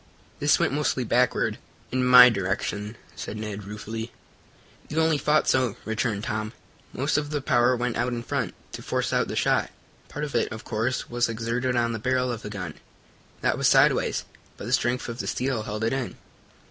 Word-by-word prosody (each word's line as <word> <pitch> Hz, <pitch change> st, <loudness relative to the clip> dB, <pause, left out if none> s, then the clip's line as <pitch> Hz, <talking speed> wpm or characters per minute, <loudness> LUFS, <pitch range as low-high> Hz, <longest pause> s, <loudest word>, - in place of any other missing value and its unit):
"This -, -, +4 dB
went -, -, +1 dB
mostly 140 Hz, -3 st, 0 dB
backward 125 Hz, +2 st, +1 dB, 0.3 s
in 130 Hz, +1 st, +1 dB
my 125 Hz, 0 st, +10 dB
direction," 105 Hz, 0 st, -2 dB, 0.2 s
said 110 Hz, -, -6 dB
Ned 105 Hz, -2 st, -5 dB
ruefully. 110 Hz, +3 st, -6 dB, 0.8 s
"You 155 Hz, -, -1 dB
only 160 Hz, -2 st, +3 dB
thought 150 Hz, +1 st, +2 dB
so," 130 Hz, -5 st, +2 dB
returned 110 Hz, -1 st, -1 dB
Tom. 110 Hz, +1 st, -3 dB, 0.4 s
"Most 140 Hz, +3 st, 0 dB
of 145 Hz, 0 st, -5 dB
the 150 Hz, -1 st, -1 dB
power 125 Hz, -1 st, +3 dB
went 120 Hz, -1 st, -2 dB
out 120 Hz, +1 st, +1 dB
in 120 Hz, -1 st, -3 dB
front, 120 Hz, -10 st, -2 dB, 0.2 s
to -, -, -7 dB
force -, -, -1 dB
out -, -, +2 dB
the -, -, -4 dB
shot. -, -, +2 dB, 0.4 s
Part 150 Hz, +1 st, -4 dB
of 145 Hz, -, -7 dB
it, 120 Hz, -, +1 dB
of 110 Hz, +1 st, -7 dB
course, 120 Hz, +3 st, -2 dB
was 120 Hz, 0 st, 0 dB
exerted 115 Hz, +3 st, -1 dB
on 120 Hz, -1 st, +1 dB
the 110 Hz, -, -3 dB
barrel 125 Hz, +2 st, +1 dB
of 115 Hz, -2 st, -5 dB
the 105 Hz, -, -6 dB
gun 90 Hz, -7 st, -5 dB, 0.7 s
that -, -, +1 dB
was -, -, +3 dB
sideways -, -, +3 dB, 0.3 s
but -, -, -7 dB
the -, -, -2 dB
strength 125 Hz, +1 st, +1 dB
of 115 Hz, +1 st, -6 dB
the -, -, -3 dB
steel 130 Hz, -3 st, -1 dB
held 105 Hz, +1 st, -4 dB
it 115 Hz, -, +1 dB
in. 135 Hz, -2 st, -3 dB
120 Hz, 195 wpm, -26 LUFS, 110-130 Hz, 0.8 s, my